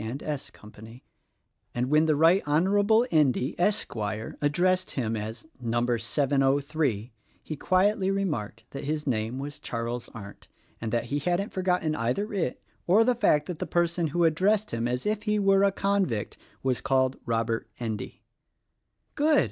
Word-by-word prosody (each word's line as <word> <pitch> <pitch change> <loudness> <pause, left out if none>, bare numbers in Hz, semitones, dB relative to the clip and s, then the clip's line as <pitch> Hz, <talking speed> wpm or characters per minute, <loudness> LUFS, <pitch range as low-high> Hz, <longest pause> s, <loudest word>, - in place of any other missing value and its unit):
and 120 +6 -5
S. 150 -3 -4
Company, 110 +3 -14 0.7
and 125 +2 -1
when 155 +1 +5
the 155 -1 +3
Right 165 +6 +5
Honorable 200 +9 +3
Endy, 140 -3 +2
Esquire, 110 - -1
addressed 180 +5 +1
him 115 -4 -2
as 110 +4 -5
Number 120 0 0
703 135 -1 0 0.3
he 155 - -5
quietly 190 +5 +2
remarked 150 - -2
that 140 - -6
his 150 +1 -2
name 115 -2 -1
was 145 +2 -6
Charles 120 -2 -4
Arndt, 100 -3 -11 0.3
and 115 -1 -3
that 120 0 +1
he 145 - +1
hadn't 180 - -1
for 190 - -2
gotten 180 -4 +1
either 130 - -1
it 175 -10 -2 0.2
or 200 +6 +6
the 250 +2 +3
fact 150 -11 +2
that 175 -4 -6
the - - -3
person 170 -1 +1
who 170 +4 0
addressed 195 +6 +2
him 115 +1 -1
as 125 +1 -2
if 210 0 0
he 210 -1 0
were 195 -1 +4
a 200 - +4
convict 195 - 0 0.3
was 130 -2 0
called 130 -1 +1
Robert 115 0 -1
Endy." 110 -3 -5 0.9
"Good!" 300 0 +3
145 Hz, 160 wpm, -27 LUFS, 120-185 Hz, 0.9 s, or